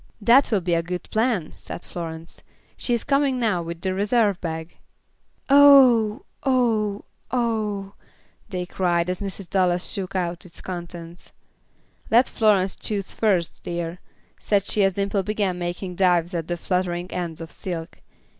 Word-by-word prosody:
"That 235 +6 +5
will 210 -4 +1
be 175 0 0
a 170 - +2
good 180 +1 -5
plan," 220 -7 0
said 175 - -9
Florence. 165 -1 -7 0.3
"She 240 - 0
is 235 - -3
coming 275 -2 +1
now 215 -7 +1
with 170 0 -6
the 190 -1 -1
reserve 205 0 +1
bag." 160 0 -5 0.7
"Oh! 270 -5 +6 0.2
Oh! 225 -6 +1 0.2
Oh!" 215 -5 -1 0.6
they 180 -2 -3
cried, 175 -1 0
as 180 - -5
Mrs. 195 -1 -6
Dallas 180 -2 +1
shook 195 -1 -5
out 175 -2 -2
its 175 -2 -13
contents. 175 -1 -8 0.8
"Let 235 +3 +5
Florence 200 -4 +2
choose 200 -3 -3
first, 190 -7 0
dear," 170 0 -4 0.4
said 200 -2 +1
she 205 - +2
as 195 -1 +3
Dimple 200 +1 0
began 195 -2 -1
making 175 +1 -4
dives 175 -2 +2
at 165 -2 -3
the 175 - -2
fluttering 180 0 -2
ends 170 -3 -4
of 165 0 -8
silk. 165 -3 -6
185 Hz, 150 wpm, -23 LUFS, 175-215 Hz, 0.8 s, Oh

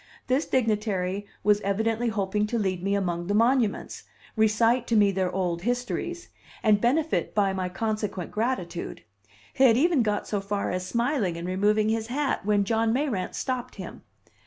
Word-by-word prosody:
This 260 +4 +1
dignitary 205 -5 0 0.2
was 210 0 +3
evidently 220 +4 0
hoping 210 0 -1
to 235 - -1
lead 190 -4 -1
me 200 +2 0
among 175 -3 -2
the 205 - 0
monuments, 230 -1 +1 0.3
recite 225 +3 +3
to 230 - +1
me 205 -2 +5
their 185 -1 -1
old 175 -2 -1
histories, 250 - -3 0.3
and 210 -2 +4
benefit 295 +7 +1
by 200 -2 +2
my 185 -1 -2
consequent 210 -2 -3
gratitude; 210 -7 -3 0.5
he 270 - +2
had 230 -2 +6
even 320 0 +3
got 210 -2 -1
so 205 -2 -1
far 200 0 -2
as 185 0 -3
smiling 235 - 0
and 170 +1 -5
removing 210 +3 +2
his 220 0 -1
hat 275 +3 -1
when 205 -1 +3
John 225 +2 +1
Mayrant 240 -8 -1
stopped 255 -2 -3
him. - - -8
210 Hz, 165 wpm, -26 LUFS, 195-240 Hz, 0.5 s, had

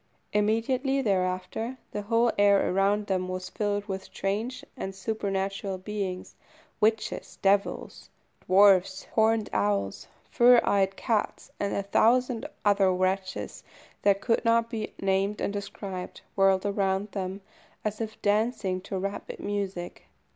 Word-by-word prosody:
Immediately 250 +6 +1
thereafter 190 +4 -1
the 205 - -3
whole 230 +3 +2
air 200 -1 +4
around 200 +2 +2
them 185 -2 -1
was 185 0 -5
filled 205 -1 -1
with 190 -2 -5
strange 215 +6 -3
and 195 -7 -5
supernatural 195 -1 -2
beings 190 -1 -4 0.5
witches, 220 +1 0
devils, 200 +1 0 0.4
dwarfs, 190 -1 +5
horned 220 -1 +3
owls, 100 -1 0 0.2
fire 245 -4 +7
eyed 195 -1 +2
cats, 220 -2 -2
and 200 - -1
a 200 - -1
thousand 235 +4 +2 0.2
other 200 -2 +4
wretches 185 +1 -2 0.4
that 200 -1 +3
could 230 +2 +1
not 230 0 +2
be 220 -3 -4
named 195 +2 0
and 200 - -1
described, 200 -2 -6
whirled 195 0 +3
around 200 0 0
them 190 0 -4 0.4
as 215 +1 -2
if 220 -1 -5
dancing 205 -3 +1
to 195 0 -5
rapid 200 +2 -5
music. 195 -4 -4
200 Hz, 125 wpm, -27 LUFS, 190-220 Hz, 0.5 s, fire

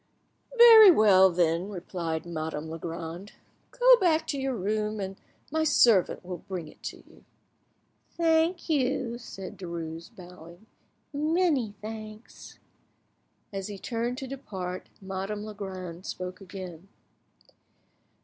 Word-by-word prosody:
"Very 455 -3 +10
well, 200 - +6
then," 170 +1 +1
replied 170 -4 -4
Madame 160 -2 -5
Legrand; 165 +3 -7 0.4
"go - - +6
back 325 -6 +2
to 280 - -3
your 265 -1 -1
room, 215 +1 -2
and 195 -1 -4 0.4
my 315 +1 +1
servant 230 - +3
will 180 -1 -6
bring 185 -5 -6
it - - -17
to - - -7
you." - - -20 0.9
"Thank 330 +1 +2
you," 255 -5 0
said 195 -6 -9
Derues, 170 -1 -6
bowing,—"many 220 - -3
thanks." 215 0 -9 1.0
As 195 0 -4
he 205 -1 -7
turned 235 +4 -3
to 265 - -6
depart, 190 -9 -6
Madame 195 +2 -5
Legrand 190 -4 -7
spoke 185 +1 -6
again. 185 -2 -9
200 Hz, 110 wpm, -27 LUFS, 180-255 Hz, 1.0 s, Very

